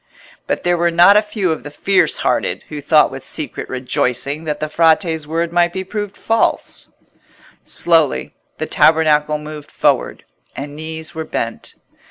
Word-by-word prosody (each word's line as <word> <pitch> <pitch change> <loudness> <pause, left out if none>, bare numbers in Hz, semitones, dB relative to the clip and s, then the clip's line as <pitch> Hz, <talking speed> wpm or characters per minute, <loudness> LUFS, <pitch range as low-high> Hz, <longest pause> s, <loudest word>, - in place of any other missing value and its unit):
But - - -2
there 175 -1 +1
were 170 0 +3
not 175 +4 +6
a 210 - +6
few 210 -4 -2
of 160 - -3
the 145 - -8
fierce 195 +6 +2
hearted - - -1
who 150 -1 -6
thought 150 +2 +4
with - - -8
secret - - -5
rejoicing 130 +3 -2
that 150 -1 -3
the 155 - -2
Frate's 160 0 +2
word 165 +2 -2
might 175 0 +3
be 190 - -3
proved 205 +1 -5
false. 225 0 -1 0.8
Slowly 165 -4 +1 0.2
the - - -2
tabernacle 150 -1 +3
moved 150 -1 -9
forward, - - 0 0.3
and 145 +1 -7
knees 160 +1 -7
were 160 -1 -4
bent. 115 -7 -5
160 Hz, 160 wpm, -18 LUFS, 150-175 Hz, 0.8 s, not